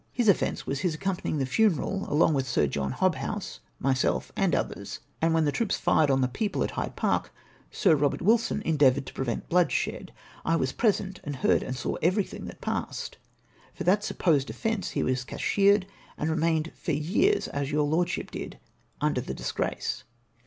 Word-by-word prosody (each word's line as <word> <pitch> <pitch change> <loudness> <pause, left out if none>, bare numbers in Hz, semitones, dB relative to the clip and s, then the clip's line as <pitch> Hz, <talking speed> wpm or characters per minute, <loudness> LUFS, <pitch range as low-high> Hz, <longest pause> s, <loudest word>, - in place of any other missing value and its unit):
His 240 -3 0
offence 200 - +2
was 135 - -2
his 165 0 0
accompanying 190 -3 -2
tbe 135 -2 0
funeral 195 - +1
along 155 +2 +4
with 135 -2 0
Sir 130 - +2
John 70 -1 -2
Hobbouse, - - -1 0.2
myself, 130 -1 0
and - - +2
others; - - -3 0.2
and 165 0 +3
when 160 -1 +3
tbe 145 - +1
troops 230 -4 0
fired 155 -2 +3
on 135 -1 +3
tbe 125 -1 -1
people 210 +3 -1
at - - -2
Hyde - - -4
Park, - - 0 0.4
Sir 160 - +3
Eobert 145 -1 +1
Wilson 220 +1 +2
endeavoured 140 -4 +3
to - - -9
prevent 125 -3 -3
bloodshed. 175 -2 +1 0.3
I 165 - +2
was 130 -5 0
present, 195 -4 0
and 145 -1 -4
heard 130 - +2
and 130 - -4
saw 125 - -3
everything 185 +5 0
that - - -10
passed. - - -4 0.6
For - - -4
that 200 +3 +3
supposed 150 -9 +1
offence 225 -5 -2
be - - +1
was 130 0 0
cashiered, 200 +7 +2 0.3
and 155 +2 -1
remained 160 0 +1
for 165 - -3
years, 200 - +2
as 140 0 -3
your 150 0 +2
lordship 160 +4 0
did, - - -6 0.4
under - - +1
tbe - - -5
disgrace. - - -3
160 Hz, 180 wpm, -27 LUFS, 135-195 Hz, 0.6 s, along